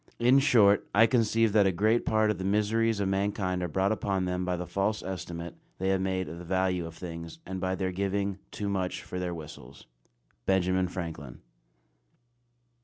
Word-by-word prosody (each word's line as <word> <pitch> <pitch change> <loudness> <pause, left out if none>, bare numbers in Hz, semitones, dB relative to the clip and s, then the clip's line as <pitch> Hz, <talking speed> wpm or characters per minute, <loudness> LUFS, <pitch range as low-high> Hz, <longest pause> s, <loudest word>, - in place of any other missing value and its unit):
In 125 +3 +5
short, 110 -8 +4
I 110 +3 +7
conceive 115 -2 +2
that 105 -2 +5
a - - +3
great 110 +6 +1
part 110 -1 +3
of 100 - -4
the - - -3
miseries 105 +2 +1
of 100 - 0
mankind 95 -1 -1
are 90 - -1
brought 95 +5 +1
upon 100 -3 -1
them 90 0 -1
by 90 -1 -1
the 90 - -4
false 100 +5 -1
estimate 85 -2 -5 0.2
they 95 +1 -1
have 95 -1 +2
made 95 -1 -1
of 80 +3 -7
the - - -8
value 90 -1 0
of 85 - -10
things, 85 - -7
and 95 -1 -5
by 95 0 0
their 95 0 -2
giving 100 +1 -1
"too 105 - -4
much 95 -2 -2
for 90 - -5
their 90 -1 -3
whistles." 75 -5 -11 0.6
BENJAMIN 95 -1 +2
FRANKLIN. 80 -8 -7
95 Hz, 185 wpm, -29 LUFS, 90-100 Hz, 0.6 s, I